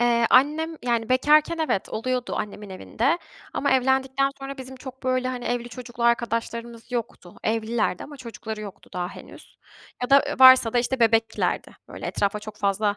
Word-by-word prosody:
Eee, 235 -1 +3
annem 305 +5 +3
Yani, 235 -2 0
bekarken, 300 +5 +4
evet, 310 -11 0
oluyordu 250 +3 -2
annemin 205 -1 -5
evinde 245 - -1 0.3
ama 280 - 0
evlendikten 265 +1 +2
sonra 275 0 -7
bizim 260 0 -9
çok, 260 0 -10
böyle, 255 0 0
hani, 250 -1 -4
evli 240 0 -2
çocuklu 240 0 -8
arkadaşlarımız 235 0 -1
yoktu. 230 -7 -5
Evlilerdi 220 -3 0
ama 290 - -11
çocukları 225 -3 -7
yoktu 205 -3 -10
daha 180 -1 -2
henüz - - -13 0.5
ya 250 - -2
da, 275 0 +7
ııı, - - -4
varsa 260 -3 +8
da, 245 - +2
işte, 250 +1 -1
bebeklerdi. 225 0 +1
Böyle, - - -7
etrafa 200 +1 -1
çok 215 0 -10
fazla 205 +1 0
240 Hz, 165 wpm, -24 LUFS, 225-265 Hz, 0.5 s, varsa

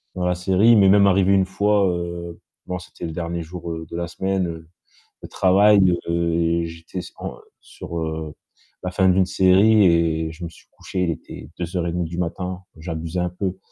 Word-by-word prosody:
dans 90 - -2
la 90 0 +1
série, 95 +4 +2
il 115 - +7
m'est 95 -1 +6
même 100 0 +6
arrivé 95 0 +3
1 95 -1 +4
fois, 100 +1 +2
heu 85 -1 -5 0.3
bon, 90 - -3
c'était 90 - -9
le 80 - -4
dernier 85 0 -3
jour 85 +1 -7 0.2
de - - -6
la 85 0 -3
semaine 95 +2 -1
de 80 0 -12
travail, 95 -1 +4
heu 85 0 0
et 85 0 +1
j'étais 85 +3 -8 0.2
en - - -6 0.3
sur, 85 - -8
heu, 80 -1 -4 0.5
la 90 - -3
fin 95 +1 +2
d'une 95 0 +3
série 95 +3 +5
et 80 -2 +2
je 85 +2 -11
me 85 - -6
suis - - -19
couché, 90 -1 -4
il 85 - 0
était 75 -4 -9
02:30 85 0 -2
du 85 +2 -6
matin, 90 +1 -3 0.2
j'abusais 80 +1 -4
un 90 - -1
peu 95 +1 -4
90 Hz, 190 wpm, -22 LUFS, 85-95 Hz, 0.5 s, il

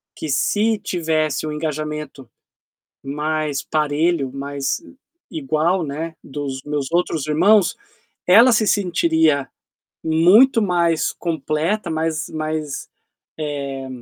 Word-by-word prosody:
que 155 - -6
se 215 +10 +1
tivesse 155 -6 -1
um 155 - -3
engajamento 150 -3 -5 0.7
mais 150 0 -2
parelho, 150 -1 0
mais, 140 0 -3
eh, - - -14 0.4
igual, 160 +4 0
né, 160 +3 -5
dos 135 -1 -5
meus 145 -1 -3
outros 165 -4 0
irmãos, 180 +5 +4 0.5
ela 230 +8 +7
se 220 -1 +3
sentiria 160 -6 +2 0.6
muito 185 +11 +5
mais 170 -4 +1
completa, 165 +4 -2
mais 160 -2 -2
mais, 155 -2 -4 0.5
eh, 140 -3 -4
155 Hz, 105 wpm, -20 LUFS, 145-170 Hz, 0.7 s, ela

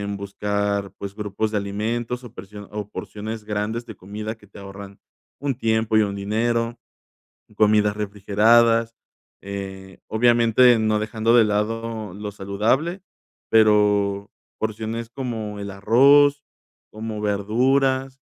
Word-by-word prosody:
buscar, 100 0 -2
pues, 100 0 -6
grupos 105 +1 -2
de 105 - 0
alimentos 115 +5 -3
o 120 - -10
persio 100 +2 -10
o 105 -1 -5
porciones 110 +1 -6
grandes 105 +3 -3
de 110 - -9
comida 105 +4 -6
que 105 - -19
te 100 - -14
ahorran 100 0 -10 0.4
un 140 -2 -2
tiempo 110 -2 +1
y - - +6
un 100 -1 -2
dinero, 115 +4 -1 0.8
comidas 105 -1 +3
refrigeradas, 110 +3 +3 0.5
eh, 95 -1 -7
obviamente 120 +1 +4
no 110 -1 +1
dejando 110 +2 +1
de 115 - +6
lado 110 0 -2
lo 105 +1 -6
saludable, 115 - -1 0.5
pero 105 -2 +3 0.3
porciones 110 +1 -3
como 115 -5 -5
el 100 0 -5
arroz, 140 +8 +5 0.5
como 110 0 -6
verduras, 130 +6 +1
110 Hz, 120 wpm, -23 LUFS, 100-115 Hz, 0.8 s, y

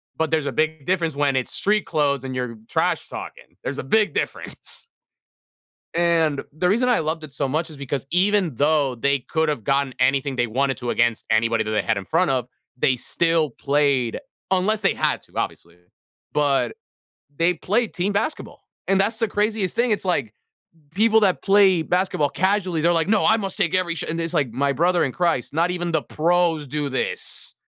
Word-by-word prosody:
But 160 0 -1
there's 155 -2 +1
a 140 - -2
bigger 155 0 -1
difference 165 -5 0
when 145 -2 +1
it's 130 - -1
street 210 +1 +1
clothes 140 -4 0
and 130 -1 -5
you're 125 -2 -3
trash - - 0
talking. - - -9
There's - - -4
a - - -3
big 210 +10 +2
difference. - - -4 1.1
And, 165 -4 +2
the 170 +5 -1
reason 235 +6 +2
I 245 - +3
loved 155 +1 -2
it 150 - -9
so 140 - -2
much 155 +5 -1
is 155 - -11
because 140 0 -4
even 190 -2 +2
though 145 -1 +2
they 140 +4 +1
could’ve 150 -1 -1
gotten 135 0 0
anything 135 +1 +1
they 120 -1 +1
wanted 135 +4 0
to 120 - -3
against 120 -2 +1
anybody 115 0 +2
that 110 - -4
they 105 -1 +1
had 110 +5 0
in 100 - -4
front 165 - +1
of, 130 -3 0 0.3
they 130 0 +1
still 165 +2 +1
played 140 -2 0 0.3
unless 205 +3 +1
they 195 - +2
had - - 0
to, - - -24
obviously, 85 +1 -4 0.6
but 145 -2 +1 0.6
they 170 +2 +3
played 210 +7 -1
team 190 +3 0
basketball, 205 +10 -3 0.2
and 195 0 +3
that's 220 +3 +1
the 225 - +1
craziest 210 -2 -1
thing, 240 0 +2
it's 210 - 0
like, 140 - -1 0.6
people 220 +2 +4
that 195 -4 +2
play 195 -4 +4
basketball 175 -5 0
casually, 185 -3 0
they're 170 +1 +3
like, 185 - -3
"No, - - +2
I 220 - +5
must 195 -3 -4
take 170 - +1
every 180 -2 +1
sh" - - -4
and 165 +1 -2
it's 165 -1 -2
like, 135 -5 +1
"My 140 +4 0
brother 175 +4 +2
in 130 - -2
Christ, 170 -9 0
not 165 +4 +1
even 175 -1 -2
the 160 - +2
pros 165 0 +1
do 145 +1 -2
this." 475 - -2
160 Hz, 195 wpm, -22 LUFS, 140-185 Hz, 1.1 s, I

